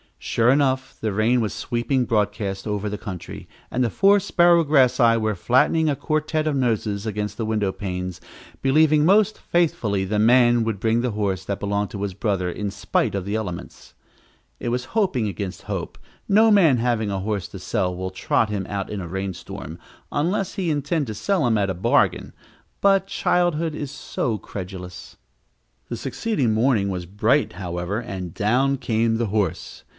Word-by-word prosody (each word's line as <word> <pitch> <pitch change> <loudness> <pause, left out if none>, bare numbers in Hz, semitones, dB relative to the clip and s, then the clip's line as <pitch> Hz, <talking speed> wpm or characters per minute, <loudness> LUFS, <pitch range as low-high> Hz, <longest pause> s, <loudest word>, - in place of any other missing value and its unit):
Sure 115 +1 +1
enough, 135 -2 0
the 110 -2 -1
rain 115 +4 +2
was 110 - -1
sweeping 125 +1 -1
broadcast 105 -2 -1
over 105 0 -2
the 105 - -4
country, 95 -5 -8 0.2
and 125 - +1
the 120 - +1
four 200 - +4
Sparrowgrassii 145 -11 +4
were 110 -1 0
flattening 140 - +2
a 145 - +1
quartet 155 +1 -1
of 155 -2 0
noses 110 -5 -1
against 105 -1 -3
the 115 - -2
window 105 -3 0
panes, 90 -2 -5 0.4
believing 150 +2 +4
most 205 +3 +4
faithfully 110 - 0
the 105 +2 -1
man 120 +1 +5
would 110 -3 -2
bring 115 +2 +1
the 125 -1 -1
horse 100 -3 -2
that 100 0 -3
belonged 100 0 -1
to 100 - -6
his 100 -2 -3
brother, 95 -2 -1
in 105 +3 -3
spite 100 0 -1
of 95 -2 -3
the 100 +2 -2
elements. 90 - -6 0.6
It - - -3
was 125 +1 -1
hoping 185 - +1
against 100 -2 -5
hope; - - -5 0.3
no 220 +3 +5
man 170 -11 +5
having 115 -3 0
a 95 - -2
horse 100 -2 -2
to - - -9
sell 90 0 -1
will 95 +1 -4
trot 105 +3 0
him 100 -3 -3
out 100 -2 -3
in 105 -2 -4
a 85 - -6
rainstorm, 95 -1 -6 0.3
unless 180 +6 -1
he 190 -4 -2
intend 145 0 -1
to 110 - -5
sell 190 - 0
him 110 -2 +2
at 100 -1 +1
a - - 0
bargain 90 - +1 0.5
but 195 -1 +3
childhood 170 -4 +1
is 145 -2 -5
so 125 -4 -3
credulous! 90 -2 -8 0.7
The - - -3
succeeding 145 - -1
morning 110 -3 +2
was 90 -2 -4
bright, 110 - +1
however, 90 +2 -3
and 95 -7 -6
down 130 +6 +2
came 115 -2 0
the 115 -1 0
horse. 100 -4 -2
110 Hz, 175 wpm, -23 LUFS, 100-140 Hz, 0.7 s, man